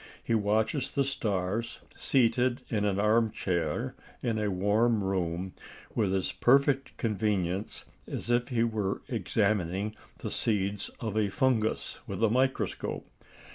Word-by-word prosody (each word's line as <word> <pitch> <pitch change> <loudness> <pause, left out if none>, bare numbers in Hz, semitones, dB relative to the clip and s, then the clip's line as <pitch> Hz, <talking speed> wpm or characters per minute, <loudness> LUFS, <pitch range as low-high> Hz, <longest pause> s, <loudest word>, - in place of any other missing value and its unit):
He - - 0
watches 110 +5 +1
the 140 - +1
stars, 110 -4 -1 0.2
seated 125 0 +2
in 105 -3 0
an 100 -1 +1
arm 110 +2 +4
chair 90 -5 -1 0.3
in 115 -3 0
a 105 -1 0
warm 105 +4 +2
room, 95 -1 -1 0.4
with 105 -4 +1
as 95 - 0
perfect 135 +1 +3
convenience 100 -3 -1 0.2
as 120 - -3
if 120 0 +2
he 120 -4 +1
were 105 -4 -1
examining 105 -2 0 0.2
the - - -5
seeds 100 -2 0
of 110 -3 -3
a 105 -2 +2
fungus 115 -1 0
with - - -3
a 110 - +4
microscope. 130 +2 0
110 Hz, 135 wpm, -29 LUFS, 100-120 Hz, 0.4 s, arm